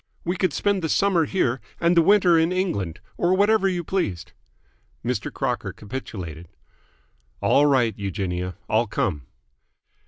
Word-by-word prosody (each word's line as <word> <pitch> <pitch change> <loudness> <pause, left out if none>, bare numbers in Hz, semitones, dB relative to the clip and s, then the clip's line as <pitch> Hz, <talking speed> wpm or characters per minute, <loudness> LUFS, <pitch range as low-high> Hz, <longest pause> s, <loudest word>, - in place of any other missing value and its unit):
We 175 +2 0
could 185 -3 +1
spend 200 +5 0
the 160 - -2
summer 185 -3 +3
here 130 -8 0 0.2
and 170 +1 +3
the 170 - +6
winter 180 -1 +5
in 165 +1 +3
England, 165 - -2 0.2
or 175 +2 +2
whatever 205 +1 +3
you 175 -2 -2
pleased." 95 - -2 0.7
Mr. 120 -3 -2
Crocker - - -2
capitulated. 95 - -7 0.9
"All 145 +1 +4
right, 125 -5 +3
Eugenia. 90 -2 -3
I'll 110 +2 +2
come." 75 -9 -2
145 Hz, 135 wpm, -24 LUFS, -, 0.9 s, the